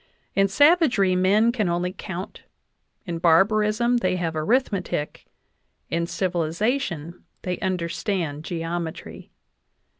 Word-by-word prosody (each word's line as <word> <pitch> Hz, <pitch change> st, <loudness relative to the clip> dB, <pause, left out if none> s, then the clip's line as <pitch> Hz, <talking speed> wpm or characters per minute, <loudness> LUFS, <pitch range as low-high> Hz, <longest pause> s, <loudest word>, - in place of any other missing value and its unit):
In 195 Hz, 0 st, +3 dB
savagery, 275 Hz, -, +4 dB
men 205 Hz, +5 st, +3 dB
can 215 Hz, -7 st, -1 dB
only 175 Hz, +1 st, -1 dB
count; 190 Hz, 0 st, -7 dB, 0.6 s
in 170 Hz, -3 st, -4 dB
barbarism, 210 Hz, +8 st, +3 dB
they 185 Hz, -5 st, 0 dB
have 170 Hz, -3 st, -2 dB
arithmetic; 185 Hz, -, -1 dB, 0.6 s
in 170 Hz, 0 st, 0 dB
civilization, 175 Hz, -, -2 dB, 0.2 s
they 180 Hz, -1 st, -3 dB
understand 175 Hz, -4 st, -2 dB
geometry. 165 Hz, -1 st, -5 dB
185 Hz, 95 wpm, -24 LUFS, 170-215 Hz, 0.6 s, savagery